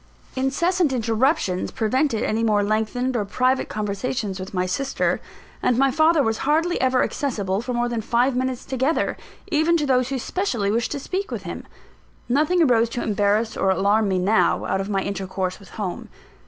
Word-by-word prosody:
Incessant 315 +5 +1
interruptions 230 - +1
prevented 235 +1 0
any 220 +1 0
more 210 -2 +3
lengthened 220 +5 -1
or 220 - +1
private 255 +6 0
conversations 210 0 -3
with 185 +1 -6
my 180 -1 0
sister; 265 +9 -1 0.4
and 245 - +2
my 275 +1 +3
father 315 +2 +4
was 225 -2 0
hardly 320 +4 +1
ever 255 0 +3
accessible 205 -9 -2
for 250 - -5
more 240 0 +1
than 235 -2 -2
five 240 +4 +1
minutes 255 -1 -2
together, 265 +4 0 0.4
even 325 +2 +3
to 300 - 0
those 255 -2 +2
who 270 - -1
specially 240 - -1
wished 235 +2 0
to 285 - -3
speak 380 +8 -3
with - - -5
him. - - -7 0.6
Nothing 310 +7 +3
arose 235 -5 +3
to 240 - -3
embarrass 210 +1 +1
or 195 - +1
alarm 200 +3 +2
me 190 -1 +1
now, 200 +5 +2
out 190 - 0
of 195 - -5
my 195 -2 0
intercourse 190 -1 -3
with 195 - -15
home. 195 -5 -5
240 Hz, 180 wpm, -23 LUFS, 205-270 Hz, 0.6 s, father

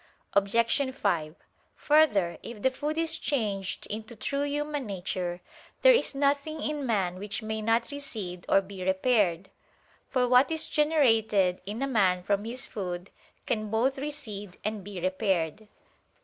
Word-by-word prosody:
Obj. 230 +7 +2
5: 165 -9 0 0.4
Further, 265 - +3
if 225 -3 -9
the 260 - +4
food 295 +4 -3
is 325 0 0
changed 205 -8 -1
into 220 +2 -6
true 280 +6 -2
human 290 -2 -2
nature, 180 -2 -3 0.4
there - - +9
is 475 - +1
nothing 285 +3 +1
in 300 -3 -2
man 185 -5 0
which 205 +3 -4
may 220 0 -3
not 230 +3 +1
recede 210 -11 -6
or 195 - +5
be 190 -1 -8
repaired: 190 -2 +1 0.6
for 250 -2 +1
what 250 +2 +5
is 320 -1 0
generated 225 - +3
in 215 +6 -3
a - - 0
man 190 -8 +2
from 200 +2 0
his 245 +3 -3
food 180 -2 -5 0.3
can 215 -2 -1
both 250 +5 +1
recede 210 -10 -6
and 215 -2 -2
be 200 -1 -7
repaired. 185 +1 -1
220 Hz, 150 wpm, -28 LUFS, 195-275 Hz, 0.6 s, there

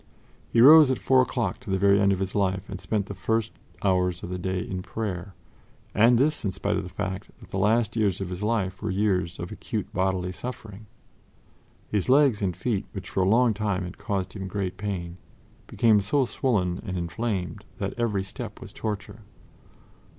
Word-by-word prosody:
He 115 - +3
rose 150 +2 +9
at 130 - +1
four 130 -1 +4
o'clock 120 -6 -1
to 125 - -11
the 95 - +1
very 100 +1 +4
end 100 0 +4
of 95 - +1
his 95 0 -3
life 95 -1 0
and 95 -2 -7
spent 100 +1 -1
the 100 - -6
first 110 +4 -1 0.3
hours 90 -3 +1
of - - -5
the 90 - -3
day 95 0 -1
in 90 +1 -4
prayer, 95 -2 -5 0.6
and 115 +3 +5
this 150 +5 +1
in 100 - 0
spite 95 - -1
of - - 0
the - - -8
fact 95 0 -4
that - - -15
the 95 - -2
last 110 +3 +2
years 105 -6 +1
of 95 -2 -4
his 90 +1 -5
life 105 -4 -1
were 110 - -2
years 95 -3 0
of 85 - -6
acute - - -5
bodily 95 0 0
suffering. 110 -1 -8 1.0
His 105 0 0
legs 135 -5 +5
and 90 -3 -1
feet, 110 -6 -1
which 95 -3 -7
for 95 - 0
a 95 - +3
long 120 +1 +4
time 100 -3 -1
had 90 +1 -8
caused 95 -2 -2
him 95 -2 -5
great 95 -1 -3
pain, 90 -4 -4 0.5
became 110 -3 +4
so 130 +7 +2
swollen 100 -9 0
and 95 -2 -4
inflamed 90 +2 -3
that - - -3
every 110 -5 0
step 105 +3 -8
was 115 -5 -11
torture. 105 +1 -5
100 Hz, 195 wpm, -26 LUFS, 95-115 Hz, 1.0 s, rose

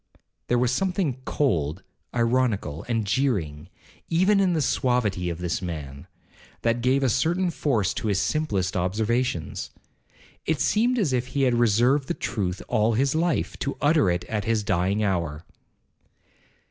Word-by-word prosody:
'—There 120 - +2
was 125 0 +2
something 175 -3 -1
cold, 85 - 0 0.3
ironical, 115 - 0
and 115 -3 0
jeering, 100 - -1 0.4
even 190 +5 +3
in 190 -2 +3
the 160 - +1
suavity 115 -9 0
of 85 - -4
this 90 +1 -2
man, 75 -6 -6 0.6
that 115 +1 +1
gave 130 +3 +2
a - - +3
certain 175 - +1
force 115 - 0
to - - -3
his 100 -3 +1
simplest 105 -12 -1
observations. 105 - -1 0.8
It 160 -3 +1
seemed 235 - +2
as 180 - +1
if 125 0 0
he 140 - -1
had 125 -2 +3
reserved 120 +4 +3
the - - -2
truth 100 -7 -3
all 110 +2 +2
his 135 +5 +1
life, 165 +1 0
to 140 - -3
utter 150 - +3
it 90 0 -1
at 105 -3 -3
his 115 -2 +1
dying 95 +2 +1
hour. 85 -6 -2
115 Hz, 150 wpm, -25 LUFS, 95-140 Hz, 0.8 s, even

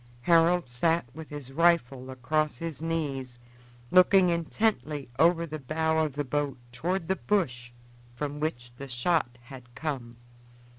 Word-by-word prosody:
Harold 170 +2 +4
sat 160 +7 +1
with 160 -1 -9
his 145 -3 -8
rifle 135 -5 +2
across 150 +4 -1
his 165 -3 -5
knees, 140 -7 -3 0.5
looking 185 0 +6
intently 170 -3 -1
over 170 0 +4
the 155 -1 -6
bows 160 +3 +1
of 145 - -10
the 145 +1 -2
boat 145 0 -1
toward 170 +7 -2
the 190 - +1
bush 130 -14 -1 0.5
from 145 +3 -4
which 120 -6 -3
the 140 - -7
shot 125 0 0
had 125 -2 -13
come. 125 -4 -4
150 Hz, 140 wpm, -28 LUFS, 130-165 Hz, 0.5 s, looking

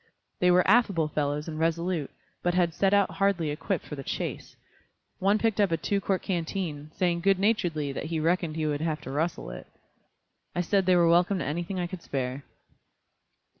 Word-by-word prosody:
They 180 - +4
were 180 0 +4
affable 195 -8 +3
fellows 150 0 -1
and 155 -1 -5
resolute, 165 -1 0 0.3
but 175 0 0
had 175 -2 +2
set 195 +3 +2
out 200 -1 +3
hardly 195 -6 +1
equipped 175 +4 -2
for 150 - -6
the 140 - -6
chase. - - -5 0.6
One 200 +3 +3
picked 220 -1 +1
up 200 -4 +2
a 165 - +2
two 200 +5 -1
quart 190 -1 -1
canteen, 165 -4 -3
saying 175 -2 +1
good 195 +1 +3
naturedly 175 -8 0
that 135 - -5
he 160 0 -2
reckoned 165 0 0
he 160 -1 -1
would 145 -1 -1
have 160 -1 -1
to 130 - -7
rustle 155 - -2
it. - - -9 0.9
I 175 - +1
said 190 +1 +1
they 185 - +5
were 170 -1 +5
welcome 175 +3 +4
to - - -3
anything 175 +5 -3
I 175 - 0
could 175 0 -7
spare. 130 -1 -3
170 Hz, 195 wpm, -27 LUFS, 155-190 Hz, 0.9 s, they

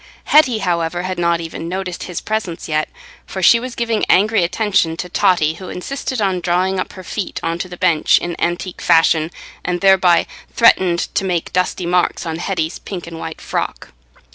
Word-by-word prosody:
Hetty, 260 -7 +4
however, 175 -3 -1
had 185 -1 -3
not 170 -1 +1
even 165 0 -6
noticed 185 -1 -4
his 180 -2 -5
presence 215 -6 -3
yet, 155 -1 -1 0.4
for 190 - -5
she 230 +7 +7
was 255 +1 -6
giving 230 -2 -1
angry 210 +1 +4
attention 180 -2 +1
to 180 - -4
Totty, 165 -3 +2
who 185 +3 -9
insisted 260 +5 -4
on 190 -3 +1
drawing 180 +2 0
up - - -4
her 185 - -10
feet 190 +1 -4
on 165 +1 -2
to 185 - -4
the 180 - -9
bench 160 -3 +3
in 175 -1 -3
antique 175 +1 -2
fashion, 160 -1 +3 0.3
and 180 -1 -1
thereby 190 -2 +4 0.3
threatened 185 -7 +4
to - - 0
make 180 -3 -2
dusty 180 0 0
marks 175 0 +1
on 160 -1 -3
Hetty's 175 -3 -2
pink 185 -3 -7
and 165 -1 -8
white - - -6
frock. - - -4
180 Hz, 185 wpm, -18 LUFS, 170-195 Hz, 0.4 s, she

